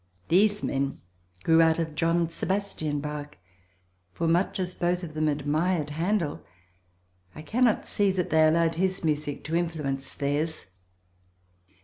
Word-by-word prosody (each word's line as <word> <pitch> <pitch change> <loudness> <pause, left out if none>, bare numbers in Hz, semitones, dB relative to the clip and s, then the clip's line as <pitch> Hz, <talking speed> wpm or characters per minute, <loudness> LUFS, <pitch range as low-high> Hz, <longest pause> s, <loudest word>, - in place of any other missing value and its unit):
These 205 +4 +3
men 140 0 -1 0.4
grew 165 0 +5
out 160 -1 +4
of 165 -2 -2
John 165 +2 +1
Sebastian 165 -4 -2
Bach, 150 0 -6 0.7
for 165 - -2
much 175 +4 +1
as 180 -1 -2
both 175 +1 -1
of 160 -3 -7
them 155 0 0
admired 150 +2 0
Handel 170 0 -1 0.9
I 155 - -8
cannot 235 +7 +2
see 205 -1 +1
that 180 -2 -2
they 160 0 +5
allowed 165 +1 +3
his 185 0 0
music 150 -2 -1
to 160 - -3
influence 150 -6 -2
theirs. 150 +3 -2
165 Hz, 135 wpm, -27 LUFS, 150-180 Hz, 0.9 s, grew